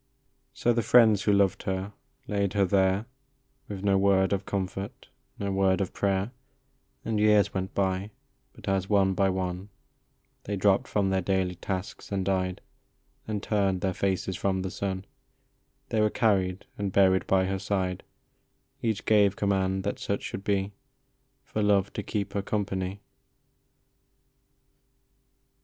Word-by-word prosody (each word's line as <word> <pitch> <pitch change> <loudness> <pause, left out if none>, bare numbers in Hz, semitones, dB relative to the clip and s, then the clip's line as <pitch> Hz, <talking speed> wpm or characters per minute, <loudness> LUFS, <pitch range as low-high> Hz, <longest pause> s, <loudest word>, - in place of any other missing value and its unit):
So 120 - +2
the 115 - +1
friends 110 -4 +5
who 105 - +2
loved 100 -2 +3
her 95 +2 -3 0.3
laid 100 -2 0
her 100 -2 +3
there 95 +2 +2 0.6
With 100 -2 -6
no 100 -1 +3
word 95 0 +3
of 100 - -2
comfort, 100 +5 -4 0.3
no 100 -2 -2
word 95 -1 +2
of 95 - -2
prayer, 100 +2 0 0.7
And 110 -2 0
years 105 -1 +4
went 95 0 -3
by; 95 0 0 0.4
but - - -14
as, 95 -1 0
one 100 -2 +3
by 95 +1 +2
one, 95 +1 -3 0.8
They 100 - -2
dropped 100 0 +2
from 100 -2 0
their 95 0 +1
daily 95 0 0
tasks 95 +3 -5
and 95 -2 -1
died, 95 -1 -1 0.7
And 105 -2 -3
turned 100 -3 +1
their 95 0 0
faces 95 0 -1
from 95 0 -1
the 95 - -4
sun, 95 -1 -3 0.8
They 110 -2 +1
were 105 - +4
carried 95 -5 +1
and 100 -1 -1
buried 95 -1 +3
by 95 -1 +3
her 95 0 -2
side, 95 -2 -1 0.8
Each 110 -3 -1
gave 105 -2 +4
command 95 -2 0
that 100 - -3
such 100 - -2
should 95 - -5
be, 100 -1 0 0.4
" - - -46
For 110 - -3
love 100 -1 +2
to - - -3
keep 100 -1 -3
her 100 - 0
company." 100 -1 -3
95 Hz, 150 wpm, -27 LUFS, 95-100 Hz, 0.8 s, friends